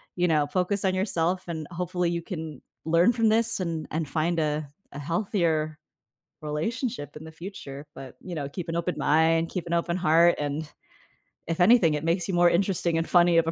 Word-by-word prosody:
you 180 0 +2
know, 150 -3 +2
focus 190 +5 0
on 185 - +2
yourself, 180 -2 0
and 160 -3 -5
hopefully 180 0 -1
you 170 0 -2
can 160 -5 -7 0.2
learn 170 +8 +4
from 225 -2 +2
this, 225 -1 +2
and 165 -3 -3
and 160 -1 -2
find 165 +2 0
a 150 -1 -1 0.2
a 145 - -8
healthier 160 -2 -1 0.6
relationship 150 - -3
in 155 - -10
the 160 - -10
future, 155 -5 -9
but, 130 -2 -10
you 180 -2 -7
know 145 -3 -3
keep 175 +2 -6
an 165 - -2
open 175 +1 -1
mind, 165 +2 +3
keep 180 -2 -4
an 170 - -2
open 170 +1 0
heart, 170 0 +4
and, 145 +1 -3 0.8
if 165 +2 -2
anything 180 -6 +5
that 150 - -2
makes 165 +2 0
you 190 - -2
more 175 0 +5
interesting 175 -2 +1
and 165 - -1
funny 175 -1 +5
of 165 - +4
a - - +1
170 Hz, 200 wpm, -26 LUFS, 155-180 Hz, 0.8 s, anything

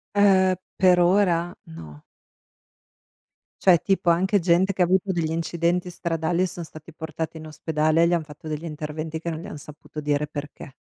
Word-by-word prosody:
Eh, 190 -2 +5 0.2
per 180 -2 +4
ora? 175 -1 +3
No. 80 -2 -11 1.6
Cioè, 185 -3 +7
tipo 190 -1 +1
anche 190 +4 +3
gente 180 +2 +2
che 190 - -2
avuto 190 +2 +2
degli 170 -3 -1
incidenti 170 +2 -1
stradali 170 0 -1
e 185 - +2
son 175 0 -7
stati 155 +1 -12
portati 160 0 -5
in 160 - -9
ospedale 155 +1 0
e 170 - +5
gli 175 - +1
han 170 - +1
fatto 150 +1 -12
degli 155 +1 -4
interventi 155 0 -5
che 170 - -4
non 160 -1 -4
gli 170 - -9
han 150 - -8
saputo 150 +1 -10
dire 145 0 0
perché 145 -2 -8
165 Hz, 175 wpm, -24 LUFS, 155-180 Hz, 1.6 s, Cioè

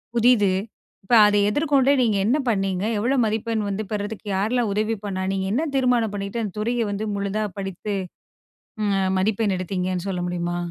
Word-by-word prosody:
புதுசு 230 -5 +4 0.5
இப்போ 235 - +3
அதை 205 0 +3
எதிர்கொண்டு 280 +1 +3
நீங்க 220 -4 +2
என்ன 250 +8 +3
பண்ணீங்க? 195 -3 0 0.2
எவ்ளோ 250 +6 +1
மதிப்பெண் 220 0 -1
வந்து 200 +2 -2
பெறுறதுக்கு 210 +1 -4
யாரலாம் 225 +2 0
உதவி 215 +2 0
பண்ணா? 190 -2 -3
நீங்க 190 -1 -1
என்ன 295 +8 +1
தீர்மானம் 245 -5 +2
பண்ணிக்கிட்டு 205 +3 -3
அந்த 200 - -5
துறையை 235 +2 0
வந்து 205 +2 -3
முழுதா 200 +2 -1
படித்து 195 +1 -4 0.9
அ 195 -2 +1
மதிப்பெண் 205 +1 +1
எடுத்தீங்கன்னு 185 0 -2
சொல்ல 180 -2 -2
முடியுமா? 175 0 -2
210 Hz, 155 wpm, -23 LUFS, 195-230 Hz, 0.9 s, புதுசு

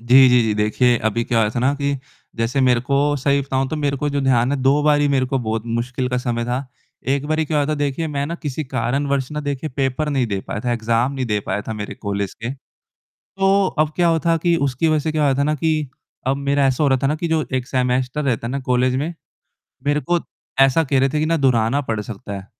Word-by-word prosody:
जी, 130 +3 +7
जी, 125 -1 +5
जी, 110 -1 0
देखिए, 110 +4 +2
अभी 110 +2 -1
क्या 115 -1 +1
हुआ 105 -1 +2
था 115 - -3
ना 130 +3 +3
कि 140 0 -1 0.4
जैसे 115 +4 0
मेरे 125 -2 +3
को 140 +3 0 0.2
सही 140 +1 +1
बताऊँ 135 -1 -1
तो 155 - -3
मेरे 145 -2 0
को 145 +2 -1
जो 140 0 -1
ध्यान 130 -2 +2
है, - - +1
2 140 +3 +3
बारी 145 -1 +3
मेरे 135 -2 +2
को 135 +1 -1
बहुत 110 -2 -2
मुश्किल 125 +3 -2
का 125 - -1
समय 120 -2 -2
था, 125 +3 -2 0.4
एक 140 +1 0
बारी 155 +1 +1
क्या 155 0 -1
हुआ 145 - +1
था 155 - 0
देखिए, 145 +2 -1
मैं 140 -2 -2
ना 165 - -4
किसी 150 0 -3
कारणवश 135 +2 -1
ना 150 - -3
देखिए 145 +1 -3
पेपर 135 +2 0
नहीं 135 -4 +1
दे 100 -3 -2
पाया 105 - -3
था, 120 - +1
एग्ज़ाम 115 +3 0
नहीं 130 -2 -3
दे 105 -2 0
पाया 105 - -1
था - - -2
मेरे 105 -1 -5
कॉलेज 100 -1 -3
के, 115 +2 -5 0.7
तो 195 0 +1
अब 155 0 +2
क्या 175 -1 +3
हुआ 165 -1 +3
था 165 0 +4
कि 170 +1 +2
उसकी 135 +5 0
वजह 155 -1 +3
से 155 +1 -2
क्या 155 -1 0
हुआ 140 -2 +3
था - - +3
ना 150 +2 +1
कि 155 -1 0 0.4
अब 135 +1 +2
मेरा 140 0 +1
ऐसा 135 +2 +1
हो 145 - +4
रहा 130 -1 +3
था - - +3
ना 145 - +1
कि 170 +2 -3
जो 160 -2 +1
एक 130 -1 -1
सेमेस्टर 125 +2 0
रहता 120 -4 -1
है - - -3
ना 135 - -2
कॉलेज 125 0 +2
में, 155 +6 -2 0.7
मेरे 145 +1 +2
को 175 +3 +1 0.4
ऐसा 135 +4 +5
कह 135 -1 +1
रहे 135 - +3
थे 150 +3 -1
कि 155 - +1
ना 165 +1 +2
दोहराना 130 -2 +2
पड़ 115 -6 -3
सकता 105 0 -7
है, 100 -1 -6
135 Hz, 260 wpm, -20 LUFS, 120-145 Hz, 0.7 s, जी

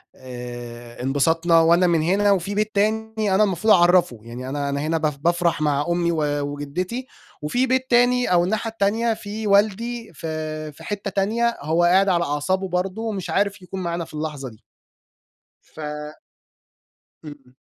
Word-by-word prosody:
آآ، 120 -1 -9
انبسطنا 165 +5 +3
وأنا 170 +2 +4
من 165 -2 +2
هنا 200 +5 +2
وفي 195 +1 0
بيت 215 0 -1
تاني 215 -1 0
أنا 215 - +5
المفروض 210 +2 +3
أعرفه، 175 - +4
يعني 125 +3 -7
أنا 140 0 -2
أنا 140 - -2
هنا 160 +2 0
ب 150 -3 -2
بافرح 170 -2 +1
مع 145 -1 +1
أمي 170 0 +1
و 150 -3 0
وجدتي 175 - -4 0.3
وفي 245 +13 0
بيت 260 0 +1
تاني 245 -2 +3
أو 175 -1 +4
الناحية 220 +5 -1
التانية 225 +2 +1
في 215 0 -6
والدي 220 +2 +1
في 155 0 -5
في 145 - -15
حتة 205 -1 -4
تانية، 230 +5 0
هو 160 +4 +1
قاعد 190 +3 +4
على 170 -2 +2
أعصابه 175 +7 -1
برضه، 185 +4 -2
ومش 200 -6 -4
عارف 200 +3 0
يكون 185 +1 -7
معانا 170 -1 -2
في - - -17
اللحظة 150 -4 -4
دي. 110 - -18 1.0
ف - - -18 1.5
إمم. 135 -4 -12
175 Hz, 160 wpm, -22 LUFS, 150-205 Hz, 1.5 s, أنا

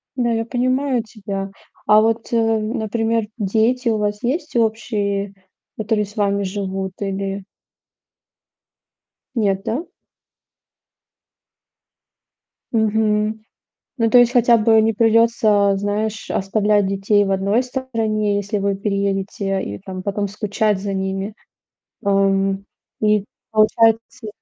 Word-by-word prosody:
Да, 240 -2 0
я 225 0 0
понимаю 255 0 0
тебя. 200 -3 -6 0.4
А 215 0 +7
вот, 225 +1 0
э, 235 - +2
например, 225 0 0
дети 225 +4 +1
у 220 - +1
вас 210 +2 -2
есть 295 +3 -2
общие, 205 -3 -1 0.4
которые 215 -1 0
с 205 - -15
вами 200 -2 +1
живут 190 -1 -3
или 195 0 -3 1.9
Нет, 195 -4 +1
да? 285 +10 -2 2.9
Мгм. 215 -1 +1 0.5
Ну, 230 -1 +2
то 245 - +6
есть 245 0 +6
хотя 240 -1 +5
бы 220 0 +4
не 225 0 +2
придётся, 220 -2 +3
знаешь, 205 +2 -2
оставлять 205 0 +1
детей 195 +1 +2
в 195 - -1
одной 200 +5 +2
стороне, 225 -5 -1
если 205 +1 -2
вы 200 0 0
переедете, 195 -1 -1
и 100 0 -6
там 185 -1 -7
потом 200 0 -2
скучать 210 0 -1
за 200 -1 -3
ними. 195 +2 -3 0.7
Ам, 195 0 +1 0.4
и 210 -2 +2 0.3
получается, 225 +1 +2
210 Hz, 115 wpm, -20 LUFS, 200-225 Hz, 2.9 s, А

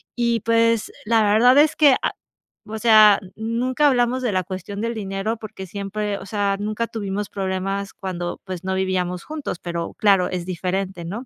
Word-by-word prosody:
y, 235 -2 +1
pues, 230 0 +2
la 225 0 +3
verdad 225 +6 +5
es 300 +1 +5
que, 290 -4 +6
a - - +1 0.6
o 220 - -5
sea, 215 -3 +7 0.2
nunca 245 +6 0
hablamos 255 -1 +2
de 245 - 0
la 185 -1 0
cuestión 190 +3 -6
del 230 +1 -2
dinero 205 +1 -3
porque 215 -3 -8
siempre 200 +2 -3
o - - -10
sea, 200 0 0
nunca 215 +3 -2
tuvimos 205 -2 -4
problemas 195 +1 -3
cuando, 180 -4 -5
pues 185 -2 -6
no 190 0 -2
vivíamos 180 -2 -1
juntos, 300 - -5
pero 170 -1 -4
claro, 195 -4 +3
es 180 -2 -4
diferente, 185 0 -3
¿no? 210 +9 -6
205 Hz, 175 wpm, -22 LUFS, 190-230 Hz, 0.6 s, sea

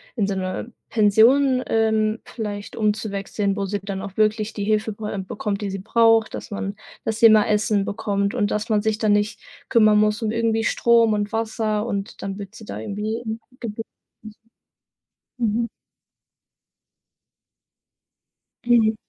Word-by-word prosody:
in 210 -5 +1
so 200 - -2
'ne 185 +5 -4 0.2
Pension, 250 +5 +4
ähm, 220 0 +1
vielleicht 205 -3 -6
umzuwechseln, 205 -2 -1
wo 200 - -2
sie 200 +1 -2
dann 195 -1 -5
auch 195 -1 -8
wirklich 215 0 +1
die 205 - -4
Hilfe 215 +1 +1
be 210 -1 -5
bekommt, 205 0 -3
die 200 - -2
sie 195 - -4
braucht, 225 +1 +3
dass - - -8
man 200 0 -4 0.3
dass 225 -1 -2
sie - - +6
immer 215 -2 +7
Essen 210 -1 +2
bekommt 200 0 -1
und 205 -4 0
dass 210 +3 -2
man 210 -1 +2
sich 220 -1 0
dann 215 -2 +3
nicht 205 +1 0 0.3
kümmern 215 -2 +5
muss 210 +2 +2
um 220 - 0
irgendwie 225 0 0
Strom 230 -1 +3
und 205 0 -1
Wasser 220 -1 -1
und 200 -2 -4
dann 195 0 -4
wird 200 0 -8
sie 220 -1 -12
da - - -6
irgendwie, 210 +1 -3
ähm, 220 0 -4 0.2
gebe 225 -1 -5 1.6
Mhm. 230 0 0 3.0
Mhm. 225 -2 +4
215 Hz, 155 wpm, -22 LUFS, 205-225 Hz, 3.0 s, immer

